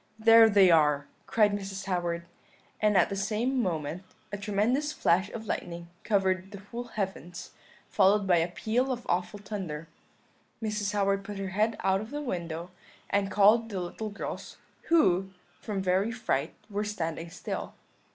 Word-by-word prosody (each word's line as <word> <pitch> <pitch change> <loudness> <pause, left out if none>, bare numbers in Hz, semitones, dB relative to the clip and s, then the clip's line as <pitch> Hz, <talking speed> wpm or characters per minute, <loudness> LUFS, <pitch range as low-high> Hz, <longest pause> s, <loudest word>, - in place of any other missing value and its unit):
"'There 225 0 +7
they 195 -3 +6
are,' 150 -3 +4 0.2
cried 210 -2 +4
Mrs. 195 -1 -4
Howard; 175 -2 -2 0.6
and 210 -2 +4
at 175 - +4
the 200 - -3
same 220 +6 0
moment 165 -3 -2 0.3
a 205 - -3
tremendous 220 +9 +1
flash 185 - +2
of 225 0 -7
lightning 170 -3 -4
covered 190 -2 +1
the 200 - -9
whole 240 +1 -4
heavens, 190 -5 -5 0.4
followed 200 +1 +3
by 180 -2 +4
a 165 +1 +2
peal 230 +8 -1
of 245 -1 -4
awful 180 +4 -1
thunder. 185 -6 -5 0.7
Mrs. 210 -2 -2
Howard 200 -1 +1
put 205 0 -7
her 195 -1 -3
head 215 +4 +1
out 190 0 +2
of 215 - -8
the 290 - -4
window, 170 - -4 0.4
and 200 -1 +1
called 210 +3 +5
the 195 -3 -3
little 180 +5 -5
girls, 205 - -6 0.3
who, 195 - +3 0.3
from 200 -3 -3
very 190 +4 +2
fright, 180 - -1
were 205 0 -2
standing 165 -5 -4
still. 165 - -5
195 Hz, 160 wpm, -29 LUFS, 180-215 Hz, 0.7 s, There